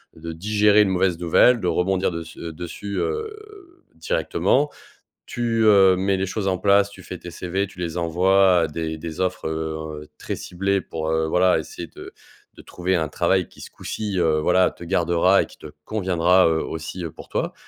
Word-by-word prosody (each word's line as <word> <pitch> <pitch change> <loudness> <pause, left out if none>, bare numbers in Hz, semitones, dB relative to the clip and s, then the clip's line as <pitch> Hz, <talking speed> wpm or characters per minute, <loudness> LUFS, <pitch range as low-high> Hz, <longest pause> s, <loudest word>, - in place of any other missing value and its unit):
de 80 +1 -7
digérer 105 +4 +3
une 105 - +3
mauvaise 90 -2 +1
nouvelle, 115 +8 +4
de 90 - -2
rebondir 95 +2 +1
dess 85 -1 -7
heu, 85 -1 -6
dessus, 90 +5 -7
heu, 425 -5 -6
directement. 150 - 0 0.6
Tu, 115 -1 -1
heu, 95 -3 +6
mets 95 +1 +1
les 95 0 -1
choses 100 +1 -3
en 95 - +1
place, 100 +1 +4
tu 100 -2 -14
fais 90 - -8
tes 90 0 -10
CV, 95 +3 -2
tu 95 -2 -13
les 85 -1 -4
envoies 90 +2 +3
à 80 - +2
des 80 +1 -4
des 80 0 -7
offres, 90 -3 -1
heu, 80 -1 -5
très - - -4
ciblées 100 +2 -1
pour, 80 -2 -4
heu, 80 0 +1
voilà, 90 +3 +3
essayer - - -7
de - - -11 0.4
de - - -14
trouver 90 +1 -2
un 80 -3 -1
travail 90 +2 +1
qui, - - -18
ce - - -10
coup-ci, 105 -3 -4
heu, 80 -2 +2
voilà 90 +4 +3
te - - -15
gardera 85 +1 +3
et - - -5
qui - - -18
te - - -11 0.2
conviendra, 95 -3 +2
heu, 80 -1 +1
aussi 80 +3 -6
pour - - -11
toi - - -2
90 Hz, 195 wpm, -22 LUFS, 85-100 Hz, 0.6 s, heu